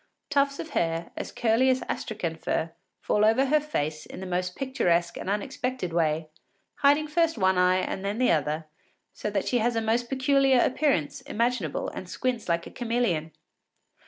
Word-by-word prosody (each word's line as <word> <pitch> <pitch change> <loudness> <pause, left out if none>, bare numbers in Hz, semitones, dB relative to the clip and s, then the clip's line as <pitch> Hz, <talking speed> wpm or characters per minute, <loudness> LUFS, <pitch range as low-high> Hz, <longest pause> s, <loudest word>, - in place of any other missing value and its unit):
Tufts 280 -1 +2
of 320 - -6
hair, 165 0 -1 0.2
curly 240 +3 +3
as 260 0 +2
Astrakhan 180 -8 -3
fur, 160 0 -2 0.3
fall 210 - +1
over 225 +5 +4
her 300 +3 +3
face 155 - -3
in - - -9
the 190 - -6
most 180 0 -2
picturesque 175 -11 0
and - - -5
unexpected 210 -1 -2
way, 160 -1 +1 0.5
hiding 290 +2 +4
first 325 -1 +1
one 190 -2 +3
eye 180 0 +4
and 190 +1 -3
then 200 +2 -2
the 255 0 +3
other, 155 0 0 0.5
so - - -4
that 200 -2 -1
she 245 - +2
has 235 +1 +1
the - - +2
most 230 +2 0
peculiar 270 -1 +3
appearance 255 - +1
imaginable 230 - -1
and 185 - -8
squints 245 -4 -2
like 170 0 +1
a - - -9
chameleon. 230 -10 -1
220 Hz, 170 wpm, -27 LUFS, 170-260 Hz, 0.5 s, over